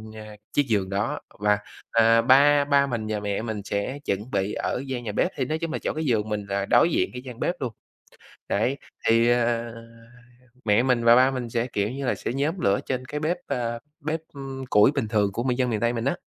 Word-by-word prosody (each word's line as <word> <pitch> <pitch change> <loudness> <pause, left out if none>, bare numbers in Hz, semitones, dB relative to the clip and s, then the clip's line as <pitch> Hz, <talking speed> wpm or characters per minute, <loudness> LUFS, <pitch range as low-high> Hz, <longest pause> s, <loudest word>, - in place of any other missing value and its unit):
a, 110 -1 -10 0.2
chiếc 145 -1 +2
giường 100 -5 0
đó, 100 +3 -1 0.2
và, 105 0 +3 0.3
à, 115 0 +5
ba 140 +4 +5
ba 140 -1 +3
mình 115 -4 -3
và 105 -1 -1
mẹ 100 0 -2
mình 110 -2 -4
sẽ 100 +7 -3
chuẩn 105 +6 -2
bị 100 +1 -1
ở 125 - -2
gian 130 -2 -4
nhà 110 - -3
bếp, 175 - 0
thì 130 - -1
nói 155 +5 -1
chung 165 -1 -3
là - - -2
chỗ - - -2
cái 155 +1 -3
giường 110 -5 +1
mình 105 -1 -3
là 100 0 -1
đối 165 - +4
diện - - +1
cái 125 - -6
gian 125 -2 -10
bếp 175 - 0
luôn. 125 -4 -3 0.8
Đấy, 120 +7 +1 0.3
thì, 115 +1 +4
à, 120 -1 +1 0.9
mẹ 105 +2 +4
mình 125 -2 +1
và 115 0 +7
ba 130 +1 +5
mình 125 -3 -4
sẽ, 115 +1 0
kiểu 105 -5 -1
như 135 +2 -4
là, - - +1
sẽ - - -4
nhóm 150 +7 -1
lửa 100 -6 +2
trên 130 -1 -2
cái 150 +3 -5
bếp, 160 +3 0
ờ, 120 -1 -2 0.2
bếp, 155 +2 -2
ừm, 135 -1 -6
củi 105 +5 +6
bình 140 -7 -2
thường 105 -3 +1
của 115 - -2
miền 125 -1 0
dân 125 -1 +1
miền 110 -2 -1
Tây 120 0 +2
mình 115 -1 -3
á. 140 +6 0
120 Hz, 240 wpm, -25 LUFS, 110-135 Hz, 0.9 s, và